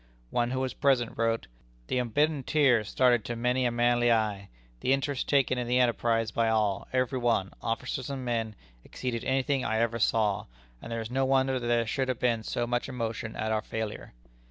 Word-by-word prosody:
One 120 0 +1
who 130 +1 -2
was 130 -1 -2
present 130 -5 +1
wrote: 115 0 0 0.4
"The 125 - -1
unbidden 145 +5 +1
tear 130 -5 +3
started 120 +1 +2
to 120 - -3
many 125 +2 +1
a 120 - +2
manly 120 0 +3
eye. 105 -3 0 0.3
The 130 - +2
interest 135 0 -1
taken 135 -3 +2
in 120 - -3
the 125 +1 +2
enterprise 115 -2 +2
by 115 0 +1
all, 105 -3 0
every 130 0 0
one, 115 -6 +1
officers 125 +3 -3
and 135 -2 -4
men, 115 -3 -2 0.3
exceeded 120 -3 -4
any 130 0 +1
thing 135 -1 0
I 110 - 0
ever 115 0 0
saw, 105 -2 +1 0.3
and - - -8
there 115 0 -2
is 110 +1 -7
no 135 +1 +1
wonder 130 0 +2
that 120 - -4
there 120 -1 +2
should 130 +4 -1
have 130 -2 -1
been 120 -3 +1
so 120 +2 -2
much 120 +2 -1
emotion 115 -3 -4
at 110 0 -2
our 110 -1 +1
failure." 110 -1 -5
120 Hz, 205 wpm, -28 LUFS, 115-130 Hz, 0.4 s, tear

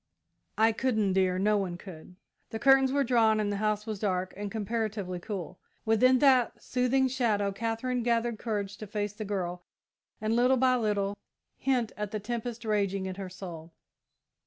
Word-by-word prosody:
"I 220 +1 +5
couldn't, 220 -4 0
dear 185 -1 +2
no 210 +2 +2
one 180 -3 -3
could!" 180 -1 -11 0.3
The 220 - -4
curtains 270 +1 +5
were 280 +1 +2
drawn 230 -4 +3
and 205 -1 0
the 205 - -2
house 210 0 0
was 215 -3 -4
dark 185 -2 -1
and 205 +1 -4
comparatively 215 -4 -3
cool. 185 -2 -6 0.3
Within 255 +4 +4
that 260 -3 +4
soothing 260 +1 +1
shadow, 220 -6 0
Katherine 230 +4 -2
gathered 235 -1 0
courage 205 -3 -3
to 215 - -8
face 205 0 -3
the 215 +1 -6
girl, 180 -3 -3 0.6
and, 215 +1 0
little 250 +2 +4
by 255 0 +4
little, 205 -4 0 0.4
hint 250 -4 0
at 210 -1 -3
the 215 - -3
tempest 235 +2 -5
raging 200 -3 0
in 190 - -3
her 190 0 -6
soul. 170 -3 -9
215 Hz, 170 wpm, -29 LUFS, 195-235 Hz, 0.6 s, I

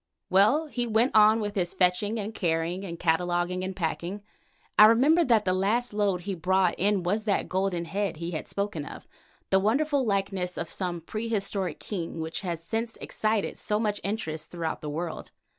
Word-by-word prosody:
Well, 215 +12 +4
he 245 -5 -3
went 230 +3 +2
on 215 +1 +6
with 205 -1 -3
his 180 -3 -1
fetching 195 +5 +2
and 210 +2 -4
carrying 170 0 -1
and 170 -3 -6
cataloguing 175 +2 0
and 190 0 -4
packing. 180 +3 -3 0.6
I 210 - +11
remember 275 +10 +5
that 230 -7 +3
the 185 - +2
last 210 +6 0
load 200 -4 +1
he 195 +2 -4
brought 185 +1 +2
in 200 -1 +2
was 205 +5 -1
the 205 - +1
golden 185 -2 -1
head 195 -1 -2
he 170 +2 -4
had 155 - -4
spoken 200 -6 -2
of, - - -10 0.4
the 190 - +5
wonderful 275 +7 +1
likeness 195 -4 -1
of 165 - -4
some 175 -3 -3
prehistoric 195 -4 -1
king 170 -5 -5
which 160 0 -4
has 170 -4 -4
since 225 +5 -3
excited 215 -1 -2
so 210 0 -1
much 210 -2 -1
interest 160 -7 -4
throughout 165 -2 -4
the 150 - -5
world. 165 +2 -5
195 Hz, 180 wpm, -27 LUFS, 175-215 Hz, 0.6 s, I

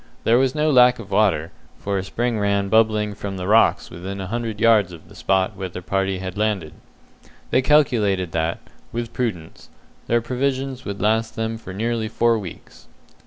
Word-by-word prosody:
There 115 +2 +4
was 130 +1 +1
no 155 0 +2
lack 125 -2 +6
of 105 -3 -10
water, 95 -6 +2 0.3
for 100 -1 -2
a - - -3
spring 120 +3 -2
ran 100 -1 +1
bubbling 110 -1 +2
from 100 -1 -6
the 90 - -4
rocks 110 +2 +3
within 95 +3 -6
a 95 - -4
hundred 110 +1 -4
yards 110 -5 +4
of 85 -2 -13
the - - -14
spot 95 +1 0
where 95 -1 -5
the 90 +1 -8
party 95 0 -1
had 95 +1 -6
landed. 105 -8 -1 0.8
They - - +4
calculated 110 - +2
that, 80 +1 -1 0.3
with 120 0 -4
prudence, 100 -10 -4 0.4
their 120 - +3
provisions 130 +2 -2
would 100 0 -4
last 110 +1 +1
them 110 0 -3
for 95 - -9
nearly 110 +3 -2
four 115 0 +2
weeks. 95 -5 -11
105 Hz, 180 wpm, -22 LUFS, 95-120 Hz, 0.8 s, lack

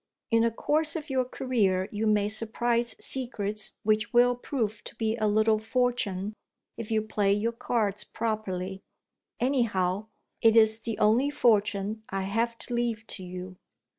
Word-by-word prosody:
In 230 0 +4
the 230 - +3
course 305 +8 0
of 305 -3 -5
your 260 -1 +1
career, 210 -8 0
you 220 +1 -1
may 210 -1 +3
surprise 235 +1 +2
secrets 215 -5 0
which 215 0 +1
will 245 +1 +4
prove 225 -4 -3
to - - -7
be 225 -1 -1
a 215 -1 +1
little 215 +1 +3
fortune, 220 -4 -1 0.4
if 230 -2 -7
you 220 -1 +1
play 205 -2 +1
your 215 +3 0
cards 210 -3 -1
properly. 195 -4 -3 0.6
Anyhow, 215 -7 0 0.3
it 225 -1 +5
is 220 -1 +5
the 225 -1 -4
only 225 +6 +3
fortune 215 -5 +1
I 195 0 -2
have 230 +4 -1
to 245 - -6
leave 235 -2 -1
to 190 - -6
you." 180 +1 -8
220 Hz, 155 wpm, -27 LUFS, 205-235 Hz, 0.6 s, it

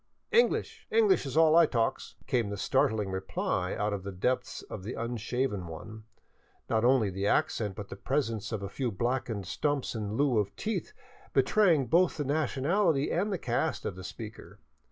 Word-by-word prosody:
" - - -48
English! - - -3
English 440 - +3
is 135 +3 -4
all 160 -1 +6
I 170 -1 +7
talks," 115 -4 -1
came 115 -5 0
the 100 - -4
startling 105 0 +1
reply 95 -2 -2
out 105 0 -1
of. 100 - -3
the 100 +1 -6
depths 125 +8 -1
of - - -8
the 105 +6 -5
unshaven 115 -3 -2
one, 110 +7 -9 0.6
not 110 0 +1
only 120 -5 +4
the 95 +2 -2
accent 105 -2 +1
but 100 0 -7
the - - -6
presence 115 -6 -2
of; 110 -3 -3
a - - -3
few 125 +5 -2
blackened 115 -1 -2
stumps 145 +9 -1
in 110 -1 -3
lieu 140 -6 +3
of 100 -1 -2
teeth 220 +1 -3 0.4
betraying 175 -10 +4
both 170 +8 +3
the 145 - -2
nationality 150 +3 +1
and 200 +5 0
the 190 - 0
caste 130 +2 -1
of 90 - -3
the 95 - -9
speaker. 110 +3 -9
120 Hz, 180 wpm, -30 LUFS, 105-145 Hz, 0.6 s, I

